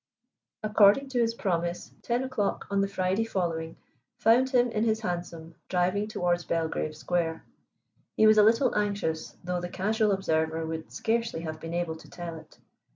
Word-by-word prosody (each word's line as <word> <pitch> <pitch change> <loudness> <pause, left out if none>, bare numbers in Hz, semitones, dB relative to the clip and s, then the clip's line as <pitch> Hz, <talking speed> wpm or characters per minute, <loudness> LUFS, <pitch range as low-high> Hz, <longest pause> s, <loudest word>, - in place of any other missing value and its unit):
According 215 +5 +5
to 255 -2 -1
his 230 -1 +1
promise, 175 -4 -2
ten 240 +2 0
o'clock 260 -6 -2
on 200 0 +2
the 195 - +1
Friday 190 +2 0
following 170 -6 -3 0.4
found 245 +4 +4
him 245 -2 +3
in 215 0 0
his 220 -1 +1
hansom 170 -4 -5 0.2
driving 185 +3 +1
towards 175 -4 0
Belgrave 160 -2 -2
Square. 165 0 -2 0.7
He 220 - +5
was 215 0 +7
a - - +8
little 230 +4 +4
anxious, 200 -6 -2
though 180 0 -2
the 175 - -4
casual 210 +3 +1
observer 160 -4 0
would 160 0 -5
scarcely 230 -6 -1
have 155 -1 -5
been 165 +2 -5
able 170 -2 -2
to - - -15
tell 175 -2 -7
it. 155 - -18
185 Hz, 165 wpm, -28 LUFS, 165-220 Hz, 0.7 s, a